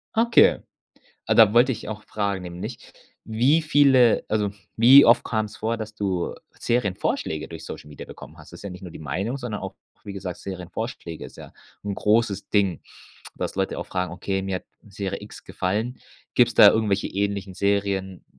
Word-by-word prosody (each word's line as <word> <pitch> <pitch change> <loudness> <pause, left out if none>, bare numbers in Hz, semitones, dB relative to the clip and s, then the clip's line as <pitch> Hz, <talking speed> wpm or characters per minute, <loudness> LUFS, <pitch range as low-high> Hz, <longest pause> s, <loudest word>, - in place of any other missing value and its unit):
Okay. 230 +1 +5 0.7
Ah, - - +2
da 110 -3 +7
wollte 120 +3 +5
ich 115 -2 -6
auch 105 0 -6
fragen, 100 -3 -3
nämlich, 90 +7 -8 0.3
wie 125 +9 +2
viele 140 -6 +4
also 105 -2 0 0.3
wie 130 +5 +9
oft 115 - +5
kam's 110 -2 -2
vor, 115 +1 -1
dass 110 -1 -7
du 95 -4 -2 0.3
Serienvorschläge 95 -8 -1
durch 85 -1 -9
Social - - -9
Media 75 - -10
bekommen - - -12
hast? - - -15
Das - - -10
ist - - -14
ja 100 - -5
nicht 90 +1 -10
nur 90 - -8
die - - -10
Meinung, 95 - -3
sondern 115 -6 -5
auch, - - -6 0.3
wie 100 - -7
gesagt 95 -2 -6
Serienvorschläge 90 -1 -6
ist - - -13
ja - - -11 0.3
'n 100 - -3
großes 105 -1 +1
Ding, 100 -4 +1 0.5
dass - - -4
Leute - - -1
auch - - -4
fragen: 90 -1 -3
„Okay, 95 +2 -3
mir 95 0 -3
hat 90 - -6 0.2
Serie 100 0 -5
X 105 - -12
gefallen. 110 +7 -3 0.3
Gibt's 120 -1 +3
da 105 - +9
irgendwelche 105 -3 0
ähnlichen 100 -1 -3
Serien?” 100 -1 -1
100 Hz, 180 wpm, -24 LUFS, 95-115 Hz, 0.7 s, wie